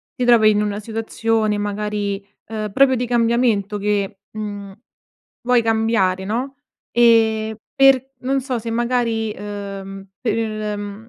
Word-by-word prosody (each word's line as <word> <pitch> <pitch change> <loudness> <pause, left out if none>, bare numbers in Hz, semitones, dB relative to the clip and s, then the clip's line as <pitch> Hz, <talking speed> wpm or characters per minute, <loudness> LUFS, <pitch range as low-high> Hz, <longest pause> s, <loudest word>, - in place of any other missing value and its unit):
ti 250 - -1
trovi 230 -3 +6
in 210 0 +1
una 205 0 -2
situazione, 225 0 -1
magari, 205 -1 -3 0.2
uhm, 215 -2 -4
proprio 270 -1 +5
di 250 0 -1
cambiamento 230 -3 +1
che, 200 -1 -1
mhmm, 205 -2 -6 0.7
vuoi 245 -1 +3
cambiare 220 -4 +1
no, 250 +6 -3 0.3
e 220 -2 +3 0.2
per 270 -1 +4
non 270 +1 0
so 255 -2 -2
se 230 +1 -5
magari, 230 -2 0
uhm, 195 -1 -7
per 230 - 0 0.4
mhmm, 205 +2 -8
220 Hz, 130 wpm, -20 LUFS, 205-235 Hz, 0.7 s, trovi